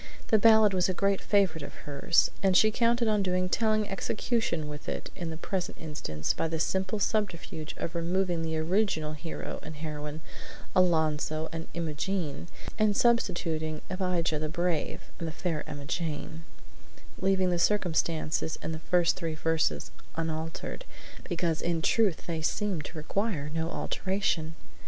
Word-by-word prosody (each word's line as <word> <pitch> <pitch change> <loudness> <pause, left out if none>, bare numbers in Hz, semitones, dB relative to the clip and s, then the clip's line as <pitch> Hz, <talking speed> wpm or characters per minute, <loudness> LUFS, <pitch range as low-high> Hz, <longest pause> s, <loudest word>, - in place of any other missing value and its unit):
The 220 - +5
ballad 220 -1 +7
was 185 0 +2
a 185 - 0
great 195 0 +2
favorite 190 -6 +2
of - - -8
hers, 145 +3 +3
and 190 -2 +5
she 215 +3 +6
counted 235 +1 +2
on 210 -1 +3
doing 185 -1 +1
telling 215 +1 +2
execution 195 -4 -1
with 150 -1 -6
it - - -4
in 170 -3 -4
the 160 - -5
present 180 +2 -3
instance 80 - -2
by 165 - -1
the 160 0 -2
simple 190 +5 0
subterfuge 185 -7 -1
of 165 - -3
removing 175 0 0
the 160 -1 -1
original 160 -2 +1
hero 155 +2 -5
and 155 +1 -8
heroine, 150 0 -5 0.5
Alonzo 160 -3 +2
and 165 0 -5
Imogene, 165 0 -2 0.3
and 215 -1 +3
substituting 170 -9 +1
Abijah 180 -4 0
the 155 0 -2
Brave 170 -1 -1 0.2
and 165 - -2
the - - -3
Fair 165 -2 -2
Emmajane, 155 +2 -4 0.7
leaving 190 -1 +3
the 175 - +1
circumstances 165 -5 +1
in 155 - -2
the 160 - -4
first 175 +1 +3
three 165 -3 -2
verses 160 0 0 0.2
unaltered, 160 - -3 0.4
because 170 -3 0
in 170 -1 +1
truth 195 +1 +2
they 165 -2 -2
seemed 180 -2 0
to 160 - -8
require 155 -2 -1
no 165 0 -1
alteration. 175 -4 -1
170 Hz, 150 wpm, -29 LUFS, 155-190 Hz, 0.7 s, ballad